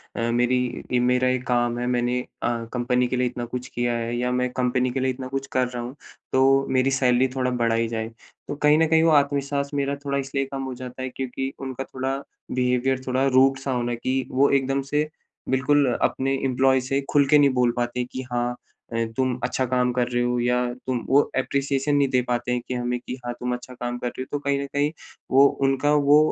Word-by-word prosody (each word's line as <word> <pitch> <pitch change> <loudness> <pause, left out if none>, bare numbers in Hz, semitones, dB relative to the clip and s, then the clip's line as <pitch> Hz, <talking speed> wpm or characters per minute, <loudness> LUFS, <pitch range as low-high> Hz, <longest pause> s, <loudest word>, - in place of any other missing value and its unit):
अ, 115 0 -1
मेरी 125 0 0
मेरा 125 +1 +2
एक 130 0 0
काम 120 -1 +1
है, 120 - -2
मैंने 125 0 +1 0.2
अ, 120 -1 -1
कंपनी 125 0 +1
के 125 - -2
लिए 125 0 +2
इतना 120 0 -4
कुछ 125 +2 -5
किया 120 -1 -1
है 115 +1 -3
या 125 +1 0
मैं 125 0 0
कंपनी 125 0 +1
के 135 - -2
लिए 130 0 +1
इतना 130 0 -6
कुछ 135 +1 -4
कर 130 -1 +1
रहा 125 -1 -5
हूँ, 125 +3 -7 0.4
तो 135 +1 +4
मेरी 130 +1 +2
सैलरी 130 -1 +3
थोड़ा 125 -1 0
बढ़ाई 115 -1 +1
जाए। 110 -1 -3 0.4
तो - - -3
कहीं 150 +1 +4
न 160 0 +3
कहीं 160 0 +4
वो 165 - +4
आत्मविश्वास 140 -1 +1
मेरा 140 0 0
थोड़ा 140 0 0
इसलिए 135 0 -2
कम 135 - -3
हो 130 -1 -4
जाता 125 +1 -8
है 130 - -3
क्योंकि 135 +1 -4
उनका 135 -1 -5
थोड़ा 135 0 -3 0.3
बिहेवियर 125 +1 +1
थोड़ा 130 +1 +1
रूड़ 135 +1 +4
सा 135 0 -3
होना, 120 -1 -1
कि 130 +2 -2
वो 140 +2 +3
एकदम 135 0 +1
से 150 +1 +1 0.4
बिल्कुल 130 0 +3
अपने 135 +1 +1
एम्प्लॉयी 130 0 +3
से 135 +2 -1
खुल 145 -2 +4
के 150 - +6
नहीं 145 -1 +5
बोल 125 -1 +3
पाते 120 0 -1
हैं, 125 - -1
कि 130 - -4
हाँ 120 0 -1 0.4
अ, - - -3 0.2
तुम 130 -1 0
अच्छा 130 - 0
काम 125 0 +1
कर 125 -1 +1
रहे 120 0 0
हो 125 0 0
या 125 +1 +2 0.3
तुम 130 -1 0
वो 140 +2 +6 0.2
अप्प्रेसिएशन 140 +2 0
नहीं 140 -1 +3
दे 125 -1 +2
पाते 120 0 -1
हैं 125 0 0
कि - - -3
हमें 125 0 -2
कि 125 - -6
हाँ, 120 - -2
तुम 125 0 -2
अच्छा 125 +1 -7
काम 120 0 -4
कर 125 - -3
रहे 120 - -6
हो। 130 - -5
तो 145 - -1
कहीं 140 -1 0
न - - -3
कहीं 145 +1 +1 0.4
वो 135 +2 +7 0.2
उनका 140 +2 +2
वो 145 0 +5
130 Hz, 230 wpm, -24 LUFS, 125-135 Hz, 0.4 s, वो